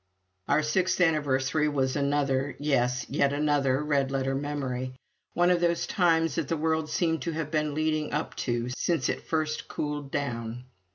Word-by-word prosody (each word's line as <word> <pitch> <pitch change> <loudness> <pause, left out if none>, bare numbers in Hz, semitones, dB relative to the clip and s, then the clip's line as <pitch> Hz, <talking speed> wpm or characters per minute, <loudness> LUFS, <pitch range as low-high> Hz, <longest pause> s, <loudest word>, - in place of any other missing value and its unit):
Our 155 - +3
sixth 180 +5 +1
anniversary 150 -3 +2
was 135 -3 0
another, 140 -1 0
yes, 125 -4 +1
yet 140 - +2
another 145 -2 +1
red 140 -3 +1
letter 135 0 -1
memory 135 -3 -3 0.4
one 175 +1 +4
of 175 -1 +2
those 170 -1 +1
times 165 -4 +2
that 160 -2 -2
the 165 - -1
world 160 0 0
seemed 160 -1 0
to 165 - -2
have 155 -1 -3
been 150 -2 0
leading 155 -1 0
up 150 +2 -2
to 120 -1 -1
since 165 -7 0
it - - -3
first 155 -1 -1
cooled 145 -2 -4
down. 120 -4 -3
145 Hz, 165 wpm, -28 LUFS, 135-160 Hz, 0.4 s, one